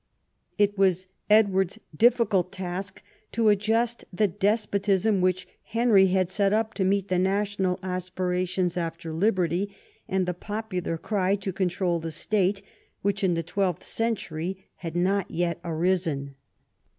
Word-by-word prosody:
It 205 -1 +2
was 185 -1 +2 0.2
Edward's 195 -4 +4 0.2
difficult 220 -4 +3
task 190 0 -5 0.3
to 225 -1 +3
adjust 225 +3 +1
the 205 +3 +2
despotism 200 0 +1
which 185 0 +1
Henry 225 -4 +4
had 185 -1 +1
set 200 0 +2
up 220 0 +1
to 195 - -1
meet 195 +1 +1
the 180 -1 +2
national 195 -1 0
aspirations 180 -1 -1
after 165 -1 -4
liberty, 190 +1 0 0.3
and 190 -1 0
the 180 - -1
popular 185 -3 -4
cry 195 +1 0
to 195 -1 -4
control 180 -2 0
the 165 0 -4
state 195 +4 0 0.4
which 200 0 0
in 180 -3 +3
the 165 - -1
twelfth 180 0 -1
century 190 -5 -2
had 165 -1 -6
not 190 +2 +1
yet 170 -1 -1
arisen. 165 -4 0
190 Hz, 135 wpm, -26 LUFS, 180-205 Hz, 0.4 s, Edward's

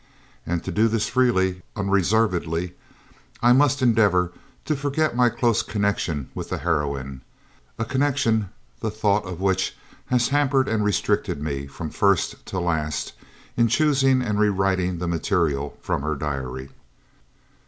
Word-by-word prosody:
And 85 0 -1
to 95 - -4
do 110 +6 +3
this 110 -1 0
freely, 95 -8 +1
unreservedly, 95 -4 +1 0.7
I 120 +1 +7
must 140 0 +3
endeavour 100 -7 +3 0.3
to 155 - 0
forget 145 0 0
my 125 0 +4
close 120 -1 +1
connection 100 - -1
with - - -6
the - - -2
heroine, 70 -3 -2 0.6
a 115 - -2
connection 130 -5 +1 0.3
the 110 - -2
thought 105 -1 +1
of 90 -2 -6
which 95 -1 0 0.3
has 125 -1 +2
hampered 140 -2 +2
and 110 -1 0
restricted 105 -7 0
me, 70 -2 -4
from 75 +3 -7
first 100 -3 +1
to 95 - -3
last, 80 -4 -2 0.4
in 115 0 +3
choosing 135 0 +3
and 105 -3 -1
rewriting 95 -3 +1
the 90 +1 -3
material 80 -4 0
from - - -1
her 75 +1 -1
diary. 65 -2 -4
100 Hz, 140 wpm, -23 LUFS, 85-120 Hz, 0.7 s, I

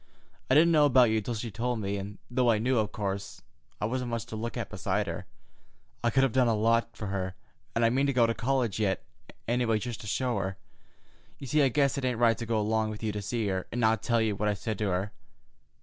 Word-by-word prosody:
I 130 - +4
didn't 165 +3 +6
know 150 -2 +5
about 125 -4 +5
you 110 0 +1
till 120 +3 -3
she 115 +1 -4
told 120 +3 -2
me, 100 -1 -2
and 100 +1 -6
though 125 0 +1
I 110 - +4
knew, 125 +2 +1
of 105 -2 -1
course, 100 -1 -4 0.4
I - - -1
wasn't 125 +2 -2
much 115 -2 -3
to - - -7
look 115 +2 -4
at - - -4
beside - - -1
her, - - -5 0.8
I 120 - +3
could 135 +3 +3
have 135 - +2
done 125 +1 +3
a 115 - +2
lot 115 +2 +1
for 105 - -5
her, 95 -1 -3 0.4
and 115 0 +3
I 115 - +4
mean 135 +3 +2
to 140 - +1
go 120 -2 +4
to 115 - +1
college 120 -3 0
yet, 100 -3 0 0.4
any 120 +2 +1
way, 115 -2 +2
just 120 +2 -5
to 105 - -8
show 120 +3 0
her. 95 0 -3 0.8
You 140 - -8
see, 150 +4 +2
I 135 - +4
guess 140 +1 +2
it 130 - -3
ain't 125 -2 0
right 115 -1 +3
to 115 - -5
go 115 -1 +1
along 110 +1 +1
with 110 +1 -7
you 110 - 0
to 105 0 -4
see 115 +2 -2
her, 95 -1 -2
and 120 - -3
not 110 -2 +3
tell 120 -1 +1
you 110 -2 +1
what 105 +2 0
I 105 - +1
said 105 +1 -4
to 105 -2 0
her. 95 +3 -1
115 Hz, 260 wpm, -29 LUFS, 105-125 Hz, 0.8 s, didn't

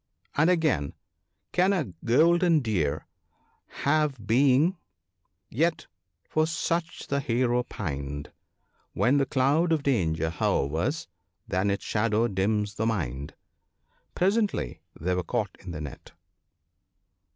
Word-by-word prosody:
And 155 +4 +4
again, 155 - +1 0.3
" - - -52
Can 185 +2 +3
a 150 - -2
golden 165 +6 +4
Deer 90 - -1 0.8
have 140 -6 +1
being 130 +4 +4
( 170 +4 +3
19 190 - -23 0.4
)? - - -50
yet 170 0 +1 0.4
for 155 0 +1
such 165 +1 -2
the 140 - -1
Hero 125 -2 +1
pined: 70 - -5 0.6
When 135 +4 +3
the 140 -1 +2
cloud 145 +6 +2
of 155 -3 +1
danger 80 - +1
hovers, 85 - 0 0.4
then 95 +3 0
its 100 - -2
shadow 115 +1 +1
dims 105 +1 0
the 110 +2 -1
mind." 70 - -3 0.8
Presently 195 - 0 0.2
they 90 +4 0
were 90 - 0
caught 85 - -2
in 90 - -10
the 80 -3 -5
net. 75 -2 -9
120 Hz, 130 wpm, -27 LUFS, -, 0.8 s, And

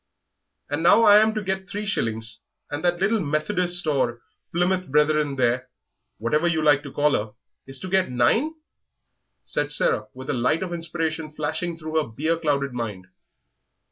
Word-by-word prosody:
"And 145 +2 -1
now 175 +7 +6
I 205 -1 +8
am 220 +1 +2
to 215 - -2
get 190 -1 -3
three 205 +2 -4
shillings, 115 - -2 0.3
and 145 +2 -4
that 175 -1 +1
little 215 +4 +2
Methodist 175 +3 0
or 130 -6 0 0.3
Plymouth 180 +2 0
Brethren 150 0 +2
there, 125 0 0 0.5
whatever 150 +9 +1
you 160 -2 +1
like 145 -2 +4
to 145 -2 -9
call 150 +2 +2
her, 105 0 -1 0.3
is 135 0 -4
to 185 - -5
get 190 0 +1
nine!" 220 - +2 0.9
said 145 0 0
Sarah, 110 -6 +1
with 130 +1 -5
a - - -1
light 125 +7 +1
of 180 -2 -5
inspiration 165 -2 -3
flashing 165 +3 -3
through 160 -1 -1
her - - -5
beer 155 +9 0
clouded 140 -4 -1
mind. 105 -6 -5
155 Hz, 170 wpm, -24 LUFS, 135-180 Hz, 0.9 s, I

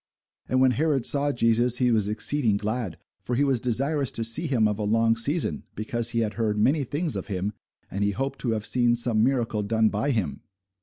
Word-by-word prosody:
And 130 - +1
when 130 0 +4
Herod 140 -1 0
saw 145 0 +2
Jesus, 120 0 +2
he 125 -1 +2
was 110 -3 +2
exceeding 110 +1 +2
glad: 105 -4 -3 0.2
for 125 - -4
he 140 - +2
was 135 -3 +2
desirous 135 +3 0
to 115 - -2
see 115 +10 +1
him 120 -6 +2
of 105 0 -3
a - - -2
long 115 +2 +2
season, 115 - -1
because 115 +2 -2
he 115 -1 -1
had 110 -1 -2
heard 110 -2 -1
many 140 +8 +2
things 145 +1 -2
of 95 - -5
him; 100 +1 -3 0.4
and 100 +2 -2
he 100 - +2
hoped 135 +6 -3
to 120 -3 -1
have 105 -1 -3
seen 120 -1 +3
some 115 -2 +1
miracle 120 -4 0
done 110 +1 +1
by 105 +7 -2
him. 90 - -2
115 Hz, 215 wpm, -25 LUFS, 110-130 Hz, 0.4 s, when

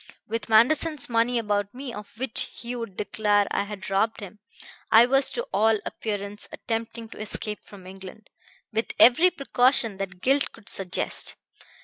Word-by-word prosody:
With 225 0 -4
Manderson's 280 +6 +3
money 235 +1 +1
about 205 -1 -1
me, 260 -2 -7
of 210 +1 -10
which 255 -1 +1
he 240 +1 -7
would 230 -6 -7
declare 205 -1 +1
I 200 - 0
had 205 -1 -8
robbed 220 +3 +1
him, 205 +1 -10 0.5
I 225 +2 +8
was 270 +2 +3
to 475 - -2
all 220 0 +3
appearance 205 -1 -4
attempting 225 0 -5
to - - -12
escape 210 0 -3
from 195 -3 -14
England, 190 +2 -12 0.4
with 225 +1 -1
every 255 +11 +7
precaution 255 - +1
that 190 -2 -6
guilt 275 +6 +1
could 225 -3 -12
suggest. 190 -1 0
220 Hz, 155 wpm, -25 LUFS, 205-245 Hz, 0.5 s, I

